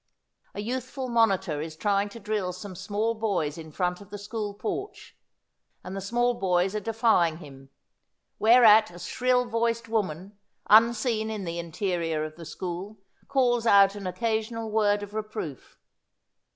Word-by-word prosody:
A 205 - -3
youth 250 +3 -3
ful 260 0 -6
monitor 195 -10 +2
is 160 0 -6
trying 200 +3 0
to 230 - -10
drill 205 -4 -2
some 185 +1 -8
small 205 +5 -1
boys 195 -10 -1
in 160 -1 -10
front 180 +4 -2
of 200 - -14
the 205 - -7
school 205 0 -5
porch, 395 - -6 0.7
and 185 - -7
the 195 - -4
small 240 +5 +1
boys 185 -3 +1
are - - 0
defying 215 -7 +2
him; 135 -4 -13 0.7
whereat 220 -1 +7
a 175 - -12
shrill 250 +7 +1
voiced 230 0 -1
woman, 200 -2 -3 0.3
unseen 225 0 +4
in 215 -2 -4
the 170 -1 -4
interior 170 -2 -2
of 155 0 -8
the 165 0 -10
school, 180 +6 -6 0.3
calls 245 -4 +2
out 200 -2 +6
an 200 -2 -6
occasional 225 +2 -2
word 205 -1 +2
of 205 0 -9
reproof. 215 - -6
205 Hz, 155 wpm, -27 LUFS, 180-225 Hz, 0.7 s, whereat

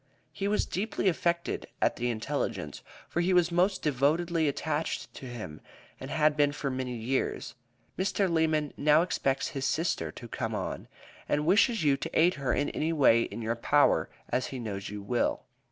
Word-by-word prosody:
He 200 - -2
was 210 +1 +1
deeply 200 +1 -2
affected 170 0 -1
at - - +2
the 120 +1 -1
intelligence, 110 -2 -3 0.3
for 175 - -1
he 185 +2 +2
was 175 -1 +4
most 185 +3 +2
devotedly 155 +4 +1
attached 150 +2 -2
to 130 - -9
him 110 -11 -7 0.4
and 130 - -7
had 155 -1 +2
been 145 -1 +3
for 140 -2 -3
many 130 -1 -3
years. 120 +4 -2 0.5
Mr. 195 +1 +1
Lemmon 160 -3 +1
now 150 +2 +4
expects 135 -6 0
his 135 -1 -3
sister 155 - -1
to - - -10
come - - -3
on, - - -4 0.4
and 150 +1 +1
wishes 220 +4 +4
you 140 -2 +3
to - - -2
aid 175 +3 +5
her 140 -5 -2
in 145 +3 +1
any 160 +2 -1
way 135 -7 +5
in 115 +1 -4
your 115 +1 0
power 145 +5 +3 0.2
as 130 - -1
he 135 - -6
knows 100 -5 -5
you 105 0 -6
will. 120 +4 0
145 Hz, 180 wpm, -29 LUFS, 125-170 Hz, 0.5 s, aid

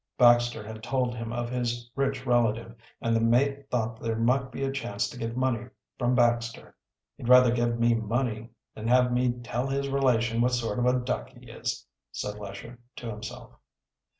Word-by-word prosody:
Baxter 120 -2 +5
had 110 0 -8
told 125 +1 0
him 115 -1 -5
of 120 0 -3
his 120 -1 -2
rich 135 -1 -1
relative, 115 -2 +1 0.3
and 115 0 +1
the 115 - +2
mate 135 +4 +2
thought 115 -2 -2
there 115 -1 -1
might 130 +3 +1
be 130 +2 -4
a 135 - 0
chance 120 -5 -2
to - - -10
get 115 0 -4
money 125 -2 0 0.3
from 125 0 +2
Baxter. 120 -2 +1 0.4
"He'd 120 - -5
rather 125 -1 +8
give 120 -1 +1
me 115 0 +4
money 115 0 -1 0.2
than 110 +1 -6
have 125 +1 +4
me 125 0 +2
tell 120 +2 -2
his 140 0 -1
relation 120 -4 +2
what 125 +1 +2
sort 120 -2 -1
of 120 - +2
a 125 0 +4
duck 125 0 -3
he - - -14
is," - - -4 0.3
said 105 0 -5
Lesher 105 +4 -8 0.2
to 115 -2 -6
himself. 105 0 -8
120 Hz, 185 wpm, -28 LUFS, 115-125 Hz, 0.4 s, rather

